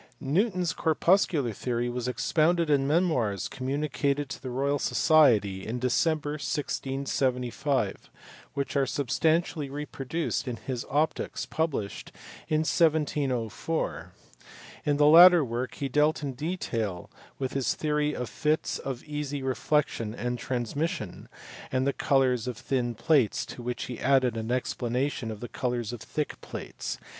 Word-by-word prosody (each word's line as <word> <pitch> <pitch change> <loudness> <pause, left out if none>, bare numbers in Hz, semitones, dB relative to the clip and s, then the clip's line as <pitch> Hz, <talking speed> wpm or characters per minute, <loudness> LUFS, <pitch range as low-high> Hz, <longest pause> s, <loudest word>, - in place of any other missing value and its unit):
Newton 180 - +1
s 170 - 0
corpuscular 160 - +2
theory 120 +3 -2
was 120 0 -3
expounded 160 +5 +2
in 135 -1 +3
memoirs 130 - +1
communicated 140 +1 -1
to - - -6
the 130 - -5
Royal 140 +3 0
Society 110 - +4
in 115 +4 -3
December, 145 +4 +1
1675, 130 -3 -1 0.5
which 140 0 -2
are 135 -1 +2
substantially 155 +3 0
reproduced 145 +1 -3
in 125 - -2
his 125 0 -5
Optics, 150 +3 0
published 150 -11 -3 0.4
in 155 0 +2
1704. 150 -4 0 0.8
In 145 -1 +3
the 145 - +5
latter 170 +1 +9
work 120 +1 -3
he 140 - -2
dealt 150 +3 +2
in 140 -2 -2
detail 120 - -3 0.3
with 130 -2 -3
his 135 -2 0
theory 150 -1 0
of 125 - -3
fits 155 +4 -1
of 130 -2 -5
easy 145 -2 -4
reflexion 130 -3 0
and 125 0 -3
transmission, 130 - -3 0.4
and 130 0 +1
the 140 - +1
colours 130 -4 +2
of 125 -3 -4
thin 120 -2 -1
plates 140 -3 +2
to - - -9
which 120 0 -3
he 125 -1 -6
added 130 -3 +3
an 110 +1 -3
explanation 125 0 -1
of 110 -2 -7
the 120 - -4
colours 120 -3 -2
of 120 - -7
thick 150 -1 -4
plates - - -6
(bk. - - -22
135 Hz, 140 wpm, -28 LUFS, 125-150 Hz, 0.8 s, latter